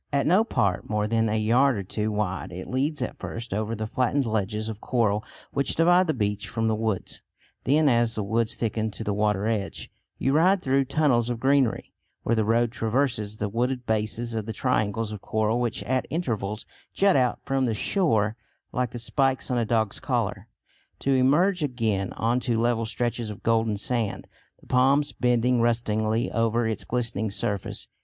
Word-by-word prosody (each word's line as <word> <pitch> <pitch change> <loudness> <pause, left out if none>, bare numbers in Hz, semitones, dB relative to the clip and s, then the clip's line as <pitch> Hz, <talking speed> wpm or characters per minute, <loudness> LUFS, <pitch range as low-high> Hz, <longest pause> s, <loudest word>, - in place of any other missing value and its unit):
At 140 -1 +1
no 185 +7 +4
part 100 - 0
more 105 -1 0
than 115 0 +1
a 110 - +1
yard 120 +4 +3
or 100 - -3
two 105 +3 -2
wide, 100 -4 -2
it 90 +1 -7
leads 135 +2 -1
at - - -6
first 115 -3 -6
over 110 +2 -2
the 110 0 -3
flattened 130 +4 0
ledges 110 -1 -1
of 110 -1 -6
coral 110 -4 +1 0.3
which 140 - 0
divide 175 +3 +4
the 155 - 0
beach 105 -3 -2
from 115 +2 -1
the 110 - +2
woods. 110 -3 -2 0.4
Then 150 +3 +4
as 120 -3 +2
the 110 - -2
woods 110 +2 0
thicken 110 -1 -1
to 105 +2 -7
the 105 - -1
water 105 -1 +1
edge, 110 -3 -3 0.3
you 135 - +1
ride 180 +5 +4
through 135 +1 +2
tunnels 130 -4 +2
of 120 -2 -2
greenery, 135 -2 +1 0.3
where 115 - +1
the 110 - +2
road 115 +2 +2
traverses 115 -3 -1
the 105 - -2
wooded 125 +4 -1
bases 110 +2 -1
of 110 -1 -3
the 110 - -3
triangles 110 -2 0
of 105 -2 -7
coral 110 +2 0
which 120 -4 -2
at 130 +5 -1
intervals 110 - -2 0.3
jut 195 -1 +3
out 125 -2 +2
from 135 -1 +1
the 115 -3 0
shore 110 - +1 0.4
like 125 -1 -1
the 120 - -7
spikes 135 +2 0
on 125 - +1
a 115 - +1
dog's 110 -2 0
collar, - - -2 0.5
to 135 - -1
emerge 155 +9 +3
again 115 -9 -1
on 115 +2 0
to 120 -3 0
level 115 -1 +1
stretches 120 0 -2
of 105 +1 -9
golden 115 -2 +2
sand, 115 -1 -2 0.4
the - - -19
palms 135 +3 +3
bending 125 0 +2
rustlingly 115 -1 0
over 115 0 +1
its 110 -3 -3
glittering 115 -3 -1
surface. 100 -1 -3
115 Hz, 185 wpm, -26 LUFS, 110-130 Hz, 0.5 s, no